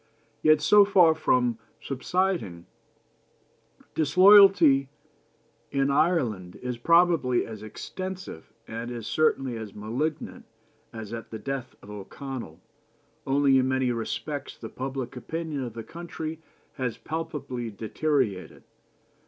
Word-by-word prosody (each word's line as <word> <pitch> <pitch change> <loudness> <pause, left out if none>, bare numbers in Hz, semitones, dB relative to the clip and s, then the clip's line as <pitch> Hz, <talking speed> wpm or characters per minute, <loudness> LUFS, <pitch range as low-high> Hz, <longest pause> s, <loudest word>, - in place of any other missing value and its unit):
Yet, 155 -1 +5
so 205 +5 +7
far 185 -5 +5
from 125 -7 +1 0.2
subsiding, 135 - -2 1.3
disloyalty 175 -4 +6 0.8
in 140 0 +1
Ireland 120 - +1
is 125 -1 -5
probably 165 -4 +3
as 110 -2 -9
extensive, 185 - -7 0.2
and 115 +2 -5
is 120 -3 -6
certainly 135 -5 +1
as 110 -3 -8
malignant, 135 +9 -4 0.5
as 110 -1 -8
at 115 -1 -7
the 110 - -6
death 135 +1 -5
of 105 - -11
O'Connell, 105 - -8 0.7
only 135 0 +4
in 130 - +1
many 130 -1 +1
respects 140 +5 -4
the - - -8
public 130 0 -5
opinion 160 +1 -4
of 120 -3 -7
the 115 - -6
country 160 +1 -7 0.4
has 125 -4 -2
palpably 145 -7 -5
deteriorated. 110 -1 -2
135 Hz, 110 wpm, -26 LUFS, 115-160 Hz, 1.3 s, so